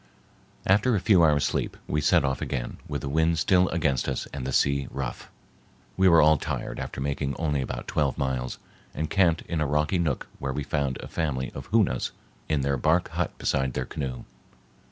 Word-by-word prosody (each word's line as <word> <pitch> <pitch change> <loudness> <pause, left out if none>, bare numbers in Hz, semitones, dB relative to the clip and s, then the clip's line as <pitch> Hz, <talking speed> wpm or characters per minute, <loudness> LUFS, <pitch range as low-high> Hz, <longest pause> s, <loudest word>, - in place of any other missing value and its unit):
After 105 +5 +3
a - - +2
few 90 -2 +4
hours' 75 -3 +4
sleep, - - -2
we 75 - -1
set 70 - +4
off 65 -1 -1
again, - - -3
with - - -3
the - - -4
wind 80 +3 +2
still 90 +3 +3
against 70 -6 0
us 65 - -2
and 65 -2 -4
the - - -2
sea 70 +1 +2
rough. 70 -2 -5 0.7
We 95 0 +5
were 85 -3 +7
all 75 0 +6
tired - - -4
after - - -5
making 70 0 -2
only 75 -4 0
about 65 - -5
twelve 75 -4 0
miles, 65 -2 -2 0.4
and 80 0 -3
camped 85 -4 +3
in 85 -3 -3
a 75 - +1
rocky 75 +5 +1
nook 80 -7 -1
where 70 -1 -3
we 75 - -2
found 70 -2 -1
a - - -7
family 70 -5 -2
of - - -8
Hoonas 110 -2 +1 0.4
in 75 -3 +1
their 70 0 0
bark 80 +7 +2
hut - - -3
beside 65 -2 0
their - - -2
canoe. 65 -5 -5
75 Hz, 195 wpm, -26 LUFS, 70-80 Hz, 0.7 s, were